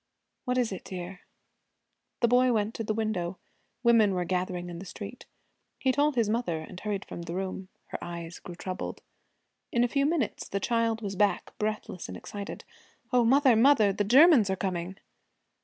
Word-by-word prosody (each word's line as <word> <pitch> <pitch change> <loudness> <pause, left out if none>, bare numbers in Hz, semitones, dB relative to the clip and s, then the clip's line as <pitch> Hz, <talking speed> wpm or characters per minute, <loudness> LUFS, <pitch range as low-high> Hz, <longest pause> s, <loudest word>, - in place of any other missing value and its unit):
'What 250 0 0
is 245 -4 +1
it, 190 - -6
dear?' 180 0 -7 1.0
The 235 - +5
boy 250 +1 +4
went 215 -1 0
to 225 - -4
the 215 0 -1
window. 190 -5 -2 0.5
Women 225 -5 +5
were 180 -1 -1
gathering 180 0 -2
in 170 -1 -7
the 190 - -8
street. 205 +5 -8 0.5
He 260 - +2
told 290 +2 +2
his 230 -3 +2
mother 215 -6 0
and 180 +3 -9
hurried 200 0 -3
from - - -7
the 170 0 -5
room. 190 0 -4 0.2
Her - - -5
eyes 170 0 -7
grew 175 - -9
troubled. 185 +1 -5 0.7
In 235 - +3
a - - +3
few 275 +3 +1
minutes 305 -8 -1
the 200 - -1
child 230 +1 0
was 200 -1 -3
back, 205 +1 +1
breathless 210 -4 -3
and 90 - -7
excited. 200 - -7 0.5
'O, 245 -1 +5
mother, 260 +1 +5
mother, 225 -4 +5
the 205 - 0
Germans 255 - +6
are 190 - +1
coming!' 185 -1 -3
205 Hz, 180 wpm, -28 LUFS, 185-235 Hz, 1.0 s, Germans